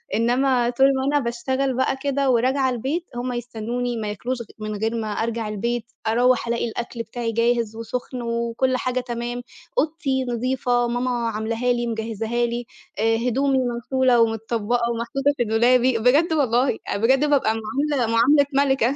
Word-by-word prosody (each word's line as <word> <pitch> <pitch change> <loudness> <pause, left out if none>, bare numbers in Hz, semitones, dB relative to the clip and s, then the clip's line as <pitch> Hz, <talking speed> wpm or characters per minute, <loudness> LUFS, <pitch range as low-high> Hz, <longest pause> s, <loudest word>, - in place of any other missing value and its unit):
إنّما 245 +2 +2
طول 255 +2 +3
ما 265 0 -1
أنا - - +5
باشتغل 260 +3 -1
بقى 260 +1 +1
كده 280 -1 0
وراجعة 260 +2 +2
البيت، 270 +8 -2
هم 250 +1 -3
يستنّوني 240 0 -3
ما 215 - -3
ياكلوش 240 +5 -3
غ - - -7
من 215 0 -4
غير 220 +3 -1
ما 225 -2 -2
أرجع 225 +1 -2
البيت، 235 +2 -2 0.2
أروّح 245 +2 +3
ألاقي 235 0 0
الأكل 235 +1 -5
بتاعي 230 +1 -4
جاهز 230 -1 +1
وسُخن 245 +2 -5
وكل 235 +2 0
حاجة 255 0 -1
تمام، 240 0 -4 0.4
أوضتي 300 -5 0
نضيفة، 245 0 0
ماما 245 0 -1
عملاها 225 +3 -1
لي، 240 0 -2
مجهّزاها 225 +1 -2
لي، 240 +1 -3 0.3
آآ 225 +1 +2
هدومي 265 +3 +1
مغسولة 250 0 +2
ومتطبّقة 230 +1 0
ومحطوطة 270 +5 0
في 240 - +2
دولابي، 240 +2 +3
بجد 285 +9 +3
والله، 255 -4 +2 0.2
بجد 235 +6 +3
بابقى 265 -6 +3
معاملة 270 +3 -1
معاملة 280 +5 +5
ملكة. 270 -2 +2
240 Hz, 155 wpm, -23 LUFS, 230-260 Hz, 0.4 s, أنا